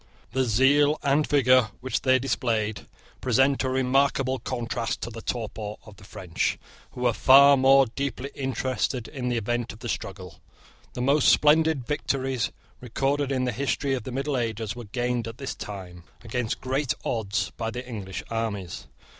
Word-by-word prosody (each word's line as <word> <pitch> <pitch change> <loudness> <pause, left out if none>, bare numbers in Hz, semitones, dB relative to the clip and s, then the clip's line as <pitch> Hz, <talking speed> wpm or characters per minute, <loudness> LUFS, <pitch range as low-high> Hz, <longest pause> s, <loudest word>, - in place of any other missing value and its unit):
The 130 +1 +1
zeal 140 +6 +4
and 145 +2 +2
vigour 130 -4 +4
which 130 +1 -2
they 130 -1 +4
displayed 115 -5 -1 0.3
present 135 +2 +3
a 130 - 0
remarkable 130 0 +1
contrast 120 -2 -3
to 120 - -5
the 115 0 -8
torpor 110 -3 -4
of 105 -2 -14
the 100 - -16
French, 90 -3 -2 0.4
who 125 - -8
were 120 -2 +3
far 140 +4 +7
more 135 0 +6
deeply 135 +2 -4
interested 130 -3 -2
in 125 -4 -4
the 120 - 0
event 120 +2 -2
of - - -13
the 115 - -7
struggle. 95 -4 -6 0.5
The 125 - -3
most 140 +3 +4
splendid 150 -3 +4
victories 135 -3 -1 0.3
recorded 135 +3 -1
in 130 -1 0
the 125 - 0
history 135 +2 -1
of 130 - -1
the 130 - -7
middle 135 +2 -1
ages 115 -2 -3
were 120 -1 -8
gained 120 +2 -2
at 115 +1 -8
this 135 0 -4
time, 90 -4 -8 0.2
against 115 0 -3
great 135 +1 -1
odds, 100 -3 -1
by 115 -1 -3
the 125 +2 -6
English 100 -6 -6
armies. 105 -6 -4
125 Hz, 165 wpm, -26 LUFS, 110-135 Hz, 0.5 s, far